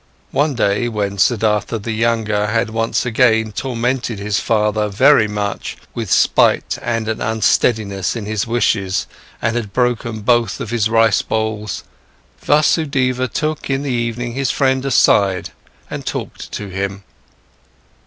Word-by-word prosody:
One 145 -1 +1
day, 105 +1 +1
when 100 -3 -3
Siddhartha 110 0 +1
the 110 +2 -5
younger 110 -2 0
had 105 +1 0
once 115 +3 -1
again 110 -2 +2
tormented 120 +1 -2
his 100 0 -1
father 105 -1 +1
very 110 +3 +5
much 105 -1 -4 0.2
with 115 -4 -4
spite - - +3
and 115 -2 -2
an 110 0 -2
unsteadiness 110 -2 +1
in 115 -3 -5
his 105 +1 -2
wishes 105 -5 0 0.4
and 110 0 +1
had 110 -5 -3
broken 120 -3 -1
both 115 -2 +1
of 115 - -5
his 115 -2 +1
rice 115 -2 +3
bowls, 110 -2 -3 0.6
Vasudeva 140 -4 +2
took 155 +6 -3
in 135 +1 0
the 140 - -2
evening 120 0 -2
his 135 0 -1
friend 130 -1 +1
aside 100 -7 +3 0.4
and - - -6
talked - - -6
to 105 -1 -5
him. 100 +1 -4
110 Hz, 140 wpm, -18 LUFS, 105-120 Hz, 0.6 s, very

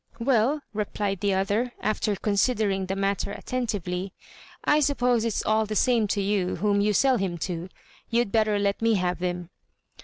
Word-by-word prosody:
"Well," 260 +4 +2
replied 205 -2 -2
the 200 -1 +1
other, 205 +6 0
after 215 -1 0
considering 200 -1 +1
the 190 - -2
matter 195 0 -1
attentively, 195 -7 -3 0.5
"I 295 - +4
suppose 250 -5 +2
it's 230 -3 -1
all 215 0 +2
the 215 - -3
same 235 -2 +3
to 200 0 0
you 195 -2 0
whom 200 +2 +1
you 210 +1 +2
sell 260 +5 +3
him 190 -4 -2
to. 175 -1 -5 0.4
You'd 235 -3 +1
better 215 -2 +2
let 200 +1 0
me 225 -1 +3
have 180 -2 -1
him." 175 -1 -3
205 Hz, 165 wpm, -26 LUFS, 195-230 Hz, 0.5 s, I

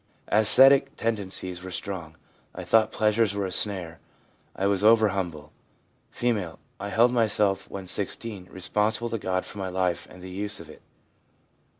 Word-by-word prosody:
Ascetic 135 +6 +6
tendencies 95 -6 -3
were 95 - -8
strong; 90 -4 -6 0.4
I - - -6
thought 110 -1 +3
pleasures 105 -1 +1
were 100 -1 -1
a 95 - -4
snare; 90 -6 -2 0.6
I 95 - -2
was 100 0 +1
over 110 0 +5
humble.' 85 -6 -5 0.6
F. 105 -9 -2 0.2
'I 100 - -5
held 120 +4 +3
myself 105 -4 +1
(when 95 -1 -7
16) 100 0 -3
responsible 105 +5 -1
to 115 - -2
God 95 -1 -2
for 105 - -9
my 95 -1 -3
life 90 -2 -1
and 90 - -14
the 95 - -8
use 100 +2 -4
of - - -11
it. - - -16
100 Hz, 160 wpm, -26 LUFS, 95-110 Hz, 0.6 s, Ascetic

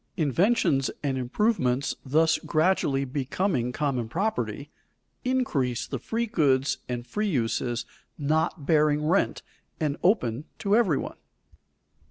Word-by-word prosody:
Inventions 165 - +2
and 140 -2 0
improvements 130 - 0
thus 155 +4 +3
gradually 155 -5 +1
becoming 135 0 -1
common 130 -5 -1
property, 210 - -2 0.5
increase 170 - 0
the - - -4
free 230 +1 -2
goods 140 - +1
and 120 -1 -3
free 210 +12 -2
uses 120 - -1 0.3
not 155 +1 0
bearing 150 -1 +3
rent 180 +6 +1 0.4
and 150 -3 -1
open 140 - +1
to 205 -1 +1
every 195 - +3
one. - - -5
150 Hz, 115 wpm, -26 LUFS, 130-190 Hz, 0.5 s, thus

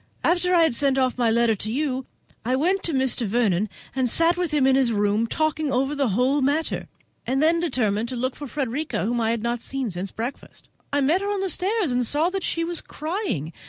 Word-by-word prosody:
After 360 +1 +2
I 335 - +6
had 320 - +2
sent 270 +2 +2
off 255 -1 +1
my 235 -2 +3
letter 230 0 +3
to 215 +1 -3
you, 265 0 -2 0.4
I 250 +3 +1
went 365 +8 +1
to 335 - 0
Mr. 260 -4 0
Vernon, 210 -2 +1 0.3
and 260 -2 +2
sat 335 +7 +4
with 355 -3 -2
him 295 -3 +2
in 265 0 +4
his 265 -3 +3
room 205 +1 +1
talking 310 +1 -1
over 270 +2 +1
the 280 -2 0
whole 255 +7 +2
matter, 290 +4 0 0.4
and 265 +2 +1
then 325 +3 +3
determined 235 -9 0
to 255 - -4
look 255 +2 -2
for 290 - -7
Frederica, 275 -1 -2
whom 240 +2 0
I 225 - +1
had 230 -1 -1
not 235 0 -1
seen 265 -4 -3
since 180 +2 -4
breakfast. 235 +5 -7 0.2
I 285 - +1
met 315 +8 +2
her 405 +1 -1
on 405 -1 -1
the 385 -2 0
stairs, 385 - 0
and 245 0 +1
saw 300 +8 +1
that 390 0 -2
she 335 -1 -1
was 340 0 -3
crying. 310 - -4
265 Hz, 230 wpm, -24 LUFS, 235-320 Hz, 0.4 s, I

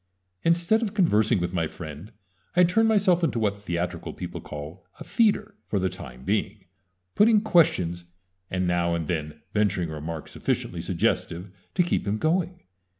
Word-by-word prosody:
Instead 170 +6 +3
of 215 -2 -2
conversing 110 - +3
with 90 +1 -2
my 85 -3 0
friend, 80 +5 -9 0.4
I 180 - +6
turned 215 +6 +4
myself 195 -5 +3
into 140 -7 +1
what 105 -3 +1
theatrical 90 -3 -3
people - - -6
call 75 +5 -8 0.2
a - - -6
"feeder" 220 -2 +2
for 105 - -1
the 95 -1 +1
time 65 -9 -9
being, 100 -1 -1 0.5
putting 215 +1 +5
questions, 90 - +2 0.4
and 95 0 -1
now 85 -1 +1
and 85 -1 -2
then 75 -2 -4
venturing 95 -6 +1
a - - -5
remark 80 +1 -5
sufficiently - - -2
suggestive 90 +3 -1 0.2
to 180 - +4
keep 170 - -1
him 105 +2 +1
going. 175 +6 0
100 Hz, 160 wpm, -26 LUFS, -, 0.5 s, I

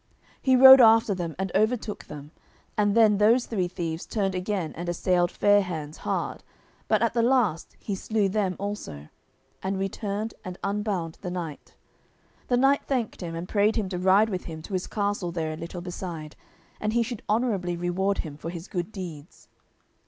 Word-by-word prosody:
He 260 -1 +4
rode 265 +1 +10
after 225 -2 +6
them 175 -4 -4
and 190 -1 -3
overtook 220 -1 0
them, 150 0 -10 0.4
and 205 +1 +2
then 215 -3 +5
those 230 +4 +4
three 190 -6 -1
thieves 170 -2 -5
turned 195 -3 -1
again 185 -2 -2
and 175 +1 -5
assailed 175 0 +1
Fair 205 +2 +4
hands 160 -5 -5
hard, - - -3 0.5
but 215 0 +2
at 230 - +1
the 235 - +2
last 230 -9 +1
he 205 - -5
slew 205 +1 0
them 195 -2 0
also, 200 - -6 0.5
and 190 +1 -2
returned 200 +2 -3
and 185 0 -7
unbound 200 -5 -2
the 185 - -4
knight. 170 -5 -6 0.7
The 245 - +2
knight 270 +2 +4
thanked 245 -8 -2
him, 165 -2 -5
and 170 +2 -5
prayed 210 +2 +2
him 210 -4 -1
to 180 -2 -3
ride 190 +4 +4
with 185 -3 -4
him 160 -1 -7
to 195 - -9
his 185 -1 -2
castle 200 -4 -2
there 160 -2 -3
a - - -5
little 170 +2 -7
beside, 175 -4 -6 0.4
and 215 +1 -1
he 235 0 +3
should 230 -1 -6
honourably 205 -6 0
reward 185 +3 0
him 145 -2 -8
for 165 - -6
his 170 +1 -7
good 180 +1 -4
deeds. 170 -6 -9
195 Hz, 180 wpm, -26 LUFS, 175-215 Hz, 0.7 s, rode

